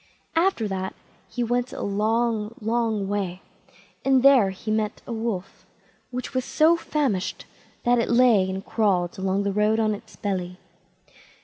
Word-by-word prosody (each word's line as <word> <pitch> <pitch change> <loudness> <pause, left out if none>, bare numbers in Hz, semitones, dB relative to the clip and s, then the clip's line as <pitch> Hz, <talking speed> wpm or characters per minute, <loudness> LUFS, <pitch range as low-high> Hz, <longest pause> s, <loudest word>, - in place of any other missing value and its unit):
After 330 - +2
that 190 -1 -4 0.3
he 245 - -2
went 245 +2 0
a - - -5
long, 220 +2 0
long 225 -2 0
way, 190 -3 -3 0.6
and 265 -1 +3
there 270 -7 +7
met 190 0 -6
him 215 0 0 0.3
a 235 - -5
Wolf, 220 -5 -4 0.4
which 250 0 -5
was 255 -1 0
so 315 +6 +4
famished 275 - -2 0.4
that 245 0 +3
it 230 - 0
lay 235 -6 +4
and 190 +1 -5
crawled 190 -5 0
along 190 +1 0
the 200 -1 -1
road 210 +2 +2
on 215 -1 +2
its 205 - -10
belly. 180 -3 -3
215 Hz, 150 wpm, -24 LUFS, 195-240 Hz, 0.6 s, there